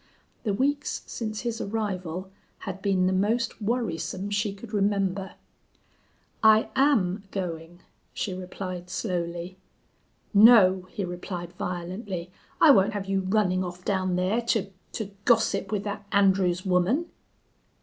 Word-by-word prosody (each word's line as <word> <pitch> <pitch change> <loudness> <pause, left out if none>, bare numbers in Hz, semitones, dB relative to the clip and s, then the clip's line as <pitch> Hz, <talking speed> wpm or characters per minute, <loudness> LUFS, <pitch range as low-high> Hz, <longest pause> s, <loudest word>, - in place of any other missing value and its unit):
The 210 - -1
weeks 285 +5 -1
since 215 -2 -4
his 235 -2 -3
arrival 190 -4 -3 0.3
had 195 -1 -6
been 195 -2 +2
the 185 - +2
most 220 +5 0
worrisome 205 -3 -2
she 205 0 0
could 205 +3 -11
remember. 195 -2 0 1.1
"I 220 0 +5
am 210 -9 +2
going," 175 -2 -5 0.3
she 195 - -3
replied, 185 -1 -6
slowly. 175 -2 -3 0.7
"No!" 200 -4 +7
he 200 - -3
replied, 175 0 -6
violently. 180 +1 -5 0.3
"I 315 - +8
won't 205 -2 +4
have 205 -2 -3
you 195 0 0
running 185 -1 +1
off 180 0 -7
down 185 -2 0
there 185 +6 +1
to 220 -4 0 0.2
to 210 -3 -4
gossip 225 -2 +2
with 205 -2 -1
that 205 0 -5
Andrews 190 -3 +3
woman." 190 - +2
195 Hz, 130 wpm, -26 LUFS, 180-215 Hz, 1.1 s, I